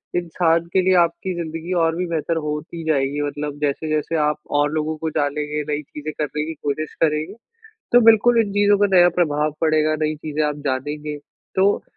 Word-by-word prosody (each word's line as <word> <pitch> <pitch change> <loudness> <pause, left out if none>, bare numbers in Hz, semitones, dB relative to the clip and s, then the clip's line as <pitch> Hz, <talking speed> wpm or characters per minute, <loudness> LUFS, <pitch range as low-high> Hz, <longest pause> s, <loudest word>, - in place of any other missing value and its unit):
इंसान 170 -1 +1
के 190 - +4
लिए 185 0 +3
आपकी 170 +2 -3
ज़िंदगी 165 +2 -5
और 165 0 +1
भी 180 +1 -2
बेहतर 165 0 -1
होती 150 +3 -5
जाएगी 140 0 0
मतलब 145 0 -5
जैसे-जैसे 155 +2 -1
आप 150 0 0 0.2
और 145 0 +2
लोगों 155 0 -1
को 160 +1 -3
जानेंगे 150 +1 -1
नई 145 - -2
चीज़ें 150 +1 -7
करने 150 0 -2
की 160 - -5
कोशिश 155 +1 -4
करेंगे, 155 +4 0 0.6
तो 245 - +7
बिल्कुल 230 +1 +5
इन 205 -3 -1
चीज़ों 205 0 +4
का 205 - +4
नया 175 0 +7
प्रभाव 150 -2 +1
पड़ेगा 155 -1 +2
नई 155 0 0
चीज़ें 155 0 -3
आप 150 0 -2
जानेंगे। 150 +3 -3 0.4
तो 195 +2 +3
155 Hz, 180 wpm, -21 LUFS, 150-170 Hz, 0.6 s, तो